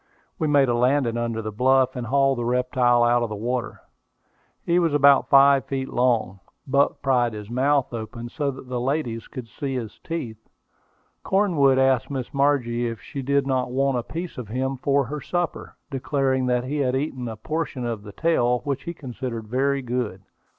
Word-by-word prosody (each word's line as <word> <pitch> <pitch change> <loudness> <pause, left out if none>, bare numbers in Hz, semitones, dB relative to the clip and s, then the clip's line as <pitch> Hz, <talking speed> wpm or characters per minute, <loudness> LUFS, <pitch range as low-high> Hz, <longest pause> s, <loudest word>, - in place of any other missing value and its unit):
We 155 - +1
made 145 -2 +4
a 120 - +1
landing 125 0 +2
under 115 -1 -2
the 110 - -4
bluff, 130 +4 +2
and 125 -2 -4
hauled 135 0 +2
the - - -1
reptile 125 0 +2
out 120 0 +3
of 120 - -1
the 105 - -4
water. 120 +3 -3 0.8
He 170 +1 +3
was 165 -4 +1
about 140 -1 +5
five 140 -1 +6
feet 135 -1 -3
long. 115 -6 +1 0.3
Buck 140 0 +1
pried 125 -4 +2
his 105 +1 -8
mouth 135 +1 +1
open, 115 +1 -6
so 145 +2 -2
that 130 -1 -8
the 125 -1 -3
ladies 125 -4 -2
could 125 -4 -8
see 135 +3 -4
his 115 -4 -5
teeth. 125 -10 -5 0.8
Cornwood 165 -10 +3
asked 130 -2 +2
Miss 130 -3 -5
Margie 130 -4 +1
if 115 -2 -5
she 135 +8 -7
did 140 +1 +1
not 130 -2 0
want 135 +1 +1
a - - -1
piece 165 +5 -6
of 120 - -6
him 130 +5 -2
for 140 +2 +2
her 150 +4 -5
supper, 175 +2 -3 0.2
declaring 135 -1 0
that 125 -1 +1
he 140 +4 -3
had 130 -2 +1
eaten 130 -3 -3
a 110 -1 -6
portion 150 0 -3
of 115 -3 -3
the 105 0 -10
tail, 125 -3 +1
which 140 +1 -3
he 170 0 -5
considered 125 -5 -6
very 135 +2 0
good. 120 -6 -3
130 Hz, 190 wpm, -24 LUFS, 120-140 Hz, 0.8 s, five